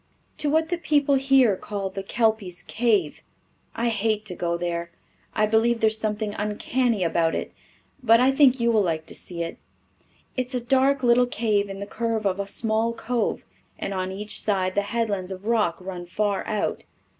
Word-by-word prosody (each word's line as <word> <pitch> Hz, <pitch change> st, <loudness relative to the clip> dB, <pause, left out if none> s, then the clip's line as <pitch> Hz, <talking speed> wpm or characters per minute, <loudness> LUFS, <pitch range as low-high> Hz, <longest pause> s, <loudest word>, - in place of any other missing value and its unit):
"To 295 Hz, -, 0 dB
what 320 Hz, +2 st, +2 dB
the 350 Hz, -1 st, -1 dB
people 290 Hz, -3 st, +2 dB
here 270 Hz, -5 st, +4 dB
call 195 Hz, 0 st, -4 dB
the 195 Hz, -, -5 dB
Kelpy's 205 Hz, -4 st, -1 dB
Cave. 210 Hz, -10 st, 0 dB, 0.5 s
I 235 Hz, +1 st, 0 dB
hate 215 Hz, -1 st, 0 dB
to 185 Hz, -4 st, -5 dB
go 170 Hz, -1 st, -1 dB
there. 170 Hz, 0 st, -3 dB, 0.5 s
I 215 Hz, -, +3 dB
believe 225 Hz, +2 st, +2 dB
there 220 Hz, -, +4 dB
is 220 Hz, -, -3 dB
something 210 Hz, -1 st, -2 dB
uncanny 210 Hz, +1 st, 0 dB
about 165 Hz, -1 st, +1 dB
it, -, -, -4 dB, 0.5 s
but 230 Hz, -2 st, +5 dB
I 255 Hz, +2 st, +5 dB
think 270 Hz, -2 st, +5 dB
you 235 Hz, 0 st, +3 dB
will 220 Hz, -2 st, +4 dB
like 160 Hz, -4 st, -1 dB
to -, -, -10 dB
see 170 Hz, -2 st, -4 dB
it. 165 Hz, -, -6 dB, 0.8 s
It 255 Hz, -1 st, -1 dB
is 255 Hz, -, -6 dB
a -, -, +1 dB
dark 265 Hz, +2 st, +2 dB
little 245 Hz, 0 st, +5 dB
cave 210 Hz, -4 st, 0 dB
in 195 Hz, 0 st, -6 dB
the 200 Hz, -, -4 dB
curve 225 Hz, 0 st, -2 dB
of 195 Hz, 0 st, 0 dB
a 200 Hz, -, -2 dB
small 225 Hz, +2 st, 0 dB
cove, 230 Hz, 0 st, -2 dB, 0.3 s
and 195 Hz, -, -4 dB
on 185 Hz, 0 st, -2 dB
each 210 Hz, +2 st, -5 dB
side 190 Hz, -3 st, 0 dB
the 205 Hz, -, +2 dB
headlands 205 Hz, -5 st, -1 dB
of 190 Hz, +1 st, -7 dB
rock 215 Hz, -7 st, +1 dB
run 180 Hz, -1 st, -7 dB
far 205 Hz, +2 st, -1 dB
out. 215 Hz, -1 st, -2 dB
215 Hz, 190 wpm, -24 LUFS, 190-235 Hz, 0.8 s, but